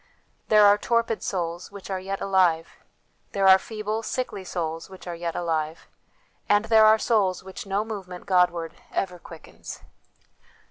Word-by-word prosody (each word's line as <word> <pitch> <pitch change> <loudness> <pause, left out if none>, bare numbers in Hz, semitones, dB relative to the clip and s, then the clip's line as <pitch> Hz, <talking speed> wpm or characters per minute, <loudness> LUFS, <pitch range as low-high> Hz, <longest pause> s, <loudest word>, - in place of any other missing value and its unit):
There 210 -1 +6
are 205 0 +6
torpid 230 -1 0
souls, 175 -2 -3
which 200 -1 -9
are 190 - -1
yet 195 +1 -5
alive; 180 -4 +2 0.6
there 195 -1 +2
are 190 0 +8
feeble, 215 +1 -4
sickly 225 -4 -4
souls, 165 -2 -4
which 190 -1 -12
are 175 - -5
yet 170 0 -4
alive; 160 -2 -2 0.6
and 205 +1 +4
there 220 -1 +6
are 215 0 +6
souls 205 -6 +1
which 190 +1 -9
no 200 +2 0
movement 190 -5 -7
Godward 175 -3 +2 0.2
ever 180 -2 -2
quickens. 165 -1 -11
190 Hz, 150 wpm, -25 LUFS, 175-210 Hz, 0.6 s, are